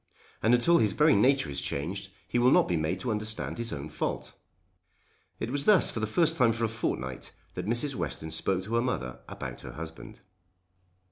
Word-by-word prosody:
And 115 +2 +5
until 170 +8 +4
his 105 -3 +2
very 150 0 +5
nature 135 - +3
is 70 - -2
changed 95 +7 -3 0.2
he 120 - 0
will 125 +1 +5
not - - +5
be 90 - 0
made 80 +4 -1
to 125 - -1
understand 110 +2 -3
his 115 0 -1
own 70 +1 -5
fault." 75 - -4 1.1
It 115 - -3
was 145 +1 0
thus 210 -5 +6
for - - -4
the 110 - -1
first 165 +7 +2
time 115 -3 +4
for 115 +1 -3
a - - +3
fortnight 65 - -4 0.2
that - - -5
Mrs. 120 +5 +1
Western 80 -9 -4
spoke 95 +2 -1
to 110 +4 -6
her 115 - +3
mother 90 - -3
about - - -7
her - - -9
husband. 80 +7 -9
110 Hz, 200 wpm, -29 LUFS, 90-125 Hz, 1.1 s, thus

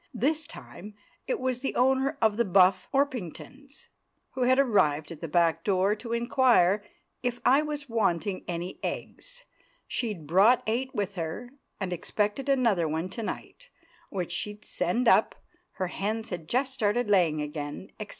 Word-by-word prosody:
This 300 +5 0
time 210 +3 -11 0.3
it - - -1
was 255 -1 -1
the 270 - -3
owner 265 +3 +2
of 220 -2 +4
the 235 - +2
Buff 185 -2 +4
Orpingtons, 275 - -3 0.4
who 260 - -5
had 255 +1 +4
arrived 185 - +2
at 165 - -9
the 165 - -4
back 165 0 +2
door 195 0 +2
to 230 +2 -8
inquire 235 -5 +3 0.4
if 245 -1 -2
I 270 +4 +6
was 295 -2 -4
wanting 200 -5 0
any 175 +1 -4
eggs—she'd 240 - -6
brought 195 - +5
eight 250 +4 -2
with 205 -1 -1
her, 175 +7 -5 0.3
and 190 -3 -2
expected 210 - -2
another 230 -11 +3
one 160 +4 -2
to 230 - -6
night, - - -7 0.4
which 180 -3 -4
she'd 210 +4 -4
send 235 +9 -1
up—her 355 - 0
hens 215 +4 -3
had 165 -3 -5
just 260 +2 0
started 235 -1 0
laying 175 -7 +3
again, 150 +5 -5
etc. 210 -1 -6
210 Hz, 150 wpm, -28 LUFS, 180-260 Hz, 0.4 s, I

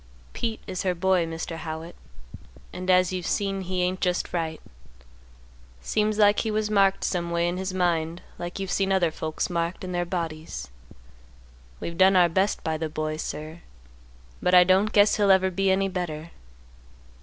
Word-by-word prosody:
"Pete 225 -2 -3
is 185 -2 -4
her 185 -2 0
boy, 180 -1 +2
Mr. 165 0 -5
Howitt, 160 +1 -6 0.8
and 185 +1 -5
as 185 0 +4
you've 180 -2 -3
seen 195 -1 -1
he 185 0 -2
ain't 185 +1 -1
just 180 -1 -1
right. 160 -2 -2 1.2
Seems 210 - 0
like 205 -1 +5
he 225 - -1
was 215 0 -1
marked 195 -1 +3
some 175 -2 -1
way 170 0 +1
in 175 +1 -2
his 190 +1 -3
mind 170 -2 -1 0.2
like 175 +1 -5
you've 195 -2 -4
seen 195 -1 +1
other 180 -4 +2
folks 155 0 -3
marked 170 +1 -2
in 185 - -5
their 175 0 0
bodies. 165 - -5 1.1
We've 170 +1 -6
done 190 +1 +6
our 175 -2 +5
best 190 +4 0
by 160 -1 -1
the 160 0 -3
boy, 155 0 -3
sir, 155 +1 -6 0.8
but 180 - +3
I 180 - +9
don't 190 +4 +3
guess 205 0 +4
he'll 205 -2 +3
ever 190 -1 +4
be 195 +2 +1
any 195 +1 +2
better. 170 -4 -4
180 Hz, 175 wpm, -25 LUFS, 170-190 Hz, 1.2 s, I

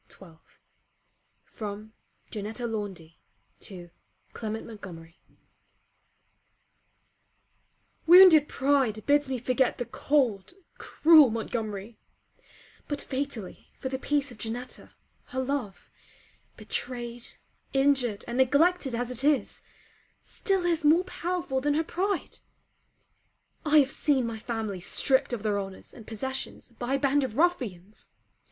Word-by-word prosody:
LETTER 180 -4 -14
XII 160 - -28 0.9
FROM 210 0 -8 0.4
JANETTEA 220 +3 -5
LAUNDY 195 -8 -5 0.4
TO 175 -3 -9 0.4
CLEMENT 220 -1 -5
MONTGOMERY 175 -6 -11 2.9
Wounded 345 -4 +9
pride 265 -6 +1
bids 290 -1 +3
me 260 - -1
forget 250 +1 +1
the 245 - -3
cold, 245 -5 0 0.3
cruel 310 -4 +6
Montgomery; 220 -1 -4 0.9
but 290 -1 -3
fatally 265 -9 -5
for 260 - -4
the 260 0 -3
peace 285 -1 -1
of 230 - -13
Janetta, 240 +3 -6 0.3
her 260 - -5
love, 260 -6 -4 0.7
betrayed 240 -1 -5 0.4
injured 270 -6 +2
and 240 +2 -3
neglected 285 +1 +3
as 245 +1 -2
it 250 +1 -3
is, 295 -1 +1 0.6
still 385 -3 -1
is 335 -3 +1
more 320 +4 +5
powerful 350 -7 -3
than 290 +1 +1
her 320 - +2
pride. 380 +3 -3 1.2
I 305 0 +4
have 275 -2 +5
seen 275 -5 +1
my 230 -1 -4
family 220 -4 -4
stripped 265 +10 +1
of 235 -4 -4
their 205 -2 0
honours 195 -1 -8
and 225 - -13
possessions 265 +3 -5
by 255 +2 -1
a - - 0
band 280 +1 +2
of 235 -4 -4
ruffians. 220 - -1
250 Hz, 120 wpm, -27 LUFS, 215-285 Hz, 2.9 s, Wounded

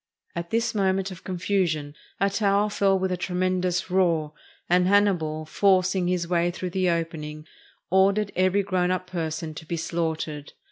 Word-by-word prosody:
At 170 0 -4
this 230 +1 0
moment'of 190 -3 -1
confusion 175 -5 -1 0.3
a 200 - +3
tower 200 0 +2
fell 195 -1 +2
with 190 0 -1
a 180 - -1
tremendous 180 0 -1
roar, 165 -5 +2 0.3
and 180 +1 +3
Hannibal, 175 -6 +2
forcing 185 +1 +2
his 180 -1 0
way 175 0 +2
through 180 +1 -5
the 185 0 +1
opening, 155 -2 -3 0.5
ordered 195 +2 +3
every 185 +2 +2
grown 185 -2 0
up 185 0 -1
person 160 -3 -4
to 155 - -9
be 170 - -2
slaughtered. 160 -3 -3
180 Hz, 150 wpm, -25 LUFS, 165-190 Hz, 0.5 s, a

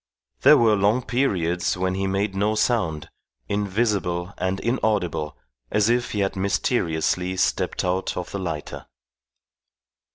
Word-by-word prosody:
There - - +8
were 110 -2 +4
long 105 +5 +2
periods 90 -10 0
when 95 0 0
he 95 +1 -1
made 95 +1 -1
no 105 +2 0
sound, 105 -10 0 0.4
invisible 100 -3 -1
and 95 +1 -1
inaudible 105 - -1 0.3
as 105 +1 +2
if 120 0 0
he 105 - 0
had 95 0 -1
mysteriously 95 -2 0
stepped 95 - 0
out 90 +1 -1
of 90 - -5
the 100 - -4
lighter. 85 -5 -5
95 Hz, 130 wpm, -23 LUFS, 90-105 Hz, 0.4 s, There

